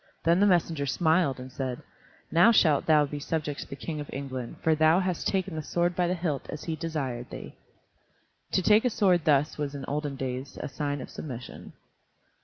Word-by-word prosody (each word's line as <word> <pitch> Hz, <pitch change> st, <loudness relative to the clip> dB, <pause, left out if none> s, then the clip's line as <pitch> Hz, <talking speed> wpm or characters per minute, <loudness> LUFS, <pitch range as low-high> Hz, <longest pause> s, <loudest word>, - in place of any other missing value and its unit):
Then 170 Hz, +2 st, +4 dB
the 205 Hz, -, +5 dB
messenger 165 Hz, -6 st, +2 dB
smiled 160 Hz, -2 st, +2 dB
and 130 Hz, +1 st, -8 dB
said, 130 Hz, -1 st, -4 dB, 0.5 s
"Now 175 Hz, +8 st, +6 dB
shalt 155 Hz, -10 st, +4 dB
thou 155 Hz, -2 st, +5 dB
be 145 Hz, +1 st, -5 dB
subject 150 Hz, -1 st, -3 dB
to -, -, -6 dB
the -, -, -7 dB
King 150 Hz, +3 st, -5 dB
of 145 Hz, -, -6 dB
England, 130 Hz, -3 st, -5 dB
for 160 Hz, -, +4 dB
thou 155 Hz, +3 st, +4 dB
hast 185 Hz, -2 st, -1 dB
taken 190 Hz, -3 st, -1 dB
the 155 Hz, -, -2 dB
sword 175 Hz, +3 st, 0 dB
by 180 Hz, -1 st, +1 dB
the 180 Hz, -, 0 dB
hilt 160 Hz, -6 st, -3 dB
as 150 Hz, -, -6 dB
he 165 Hz, -, -3 dB
desired 140 Hz, -7 st, -4 dB
thee." -, -, -8 dB, 1.0 s
To 190 Hz, -, +2 dB
take 210 Hz, +3 st, +5 dB
a 250 Hz, -, +3 dB
sword 185 Hz, -7 st, +2 dB
thus 150 Hz, 0 st, +2 dB
was 145 Hz, -1 st, -3 dB
in 140 Hz, -, -5 dB
those -, -, -7 dB
olden 145 Hz, 0 st, -2 dB
days 130 Hz, 0 st, -5 dB
a -, -, -4 dB
sign 145 Hz, -1 st, -3 dB
of -, -, -9 dB
submission. 125 Hz, -5 st, -8 dB
150 Hz, 205 wpm, -28 LUFS, 140-175 Hz, 1.0 s, Now